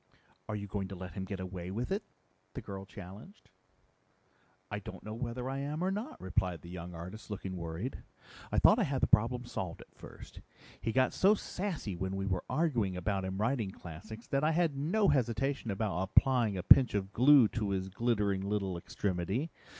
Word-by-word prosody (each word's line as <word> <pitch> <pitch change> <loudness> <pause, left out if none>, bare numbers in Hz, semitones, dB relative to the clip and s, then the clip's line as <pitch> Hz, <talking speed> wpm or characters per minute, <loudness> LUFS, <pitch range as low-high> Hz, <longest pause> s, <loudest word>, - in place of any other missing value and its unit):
"Are 110 - -1
you 100 -1 -4
going 100 -1 -3
to 95 - -7
let 90 0 -7
him 95 -2 -4
get 95 0 -5
away 90 -1 -5
with 115 - -3
it?" 200 +2 +1 0.5
the - - -4
girl 95 -1 -7
challenged. 100 - -11 1.2
"I - - -2
don't - - -9
know 110 - -6
whether 120 +2 -4
I 135 +1 -2
am 150 +4 -2
or 190 - +1
not," 210 +5 -4
replied 90 -2 -1
the 85 - -9
young 90 -1 -7
artist, 90 +7 -8
looking 95 -2 -4
worried. 85 +8 -4 0.5
"I - - 0
thought - - +7
I - - +4
had 135 -2 -1
the - - +5
problem 120 +3 +3
solved 90 -7 -5
at - - -16
first. - - -12 0.4
He 115 - 0
got 130 +2 +3
so 200 +3 +5
sassy 180 - -4
when 95 +2 -3
we 95 0 -2
were 95 -2 -1
arguing 120 - +1
about 95 +1 -1
him 95 0 -3
writing 110 0 0
classics 100 +6 -9
that 140 +1 +1
I 155 +1 +3
had 165 -3 +2
no 175 +10 +2
hesitation 130 -1 +1
about 100 -3 -1
applying 110 +1 +3
a 90 - -3
pinch 125 +2 +8
of 100 0 -2
glue 130 -1 +7
to 105 -3 -2
his 95 -1 -1
glittering 105 -2 +1
little 100 -3 -1
extremity. 95 - -2
105 Hz, 195 wpm, -32 LUFS, 95-130 Hz, 1.2 s, pinch